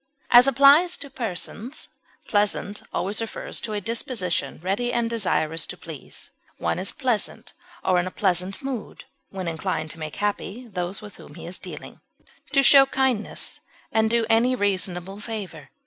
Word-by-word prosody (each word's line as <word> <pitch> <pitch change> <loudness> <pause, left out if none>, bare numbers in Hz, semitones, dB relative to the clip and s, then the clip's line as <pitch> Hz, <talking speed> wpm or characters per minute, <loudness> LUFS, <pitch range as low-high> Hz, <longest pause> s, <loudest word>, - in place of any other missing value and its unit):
As 245 +2 +9
applied 280 +6 +7
to 280 - -4
persons, 230 - -3 0.4
pleasant 205 0 +1
always 200 +5 -1
refers 225 - -4
to 215 - -3
a 210 - 0
disposition 195 - -1
ready 205 +7 0
and 235 -1 +1
desirous 180 -8 0
to - - -5
please; - - -10 0.3
one - - -1
is - - -2
pleasant, 250 -8 -2 0.3
or 185 -1 +3
in 175 - -1
a - - -2
pleasant 185 +2 0
mood, 265 -5 -5 0.3
when 190 -2 -5
inclined 160 -1 -2
to 165 - -9
make 155 -1 -5
happy 205 +3 -2
those 190 0 -3
with 210 - -10
whom - - -13
he - - -9
is - - -5
dealing, - - -9 0.5
to 275 - +4
show 275 0 +8
kindness 265 -5 0 0.3
and 220 0 +3
do 230 0 +2
any 235 +3 +4
reasonable 195 -2 -1
favor. 205 -8 -6
210 Hz, 160 wpm, -25 LUFS, 185-245 Hz, 0.5 s, As